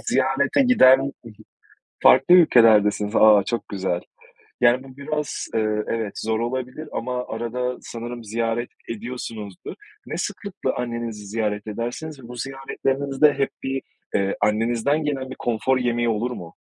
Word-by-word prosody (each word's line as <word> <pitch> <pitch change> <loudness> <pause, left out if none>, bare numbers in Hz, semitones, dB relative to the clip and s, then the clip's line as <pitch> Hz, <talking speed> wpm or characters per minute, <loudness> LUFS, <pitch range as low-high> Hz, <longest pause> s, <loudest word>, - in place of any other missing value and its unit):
ziyarete 280 - +2
giden 135 - +5 0.9
farklı 175 +7 +7
ülkelerdesiniz, 110 - +5
aaa, 105 -2 +7
çok 120 +3 -3
güzel, 95 -3 -2 0.6
yani, 120 +2 +4
bu 130 -1 -14
biraz, 150 0 -3
eee, 110 -1 +1
evet 110 -3 -3
zor 110 0 -1
olabilir 130 +5 -4
ama 125 +1 -3
arada 125 +2 -3
sanırım 120 0 -7
ziyaret 115 +2 -2 0.2
ediyorsunuzdur. 115 -4 -6 0.3
Ne - - -5
sıklıkla - - -3
annenizi 115 -3 -4
ziyaret 105 0 -2
edersiniz 120 +6 -5
ve - - -11
bu 125 - -9
ziyaretlerinizde 135 +2 0
hep 135 0 0
bir, 135 0 -2 0.3
ııı, 100 0 +1
annenizden 115 +8 +1
gelen 135 -3 -2
bir - - -7
konfor 120 +3 +1
yemeği 120 -1 0
olur 115 +3 -1
mu? 85 -8 -9
120 Hz, 135 wpm, -23 LUFS, 110-130 Hz, 0.9 s, farklı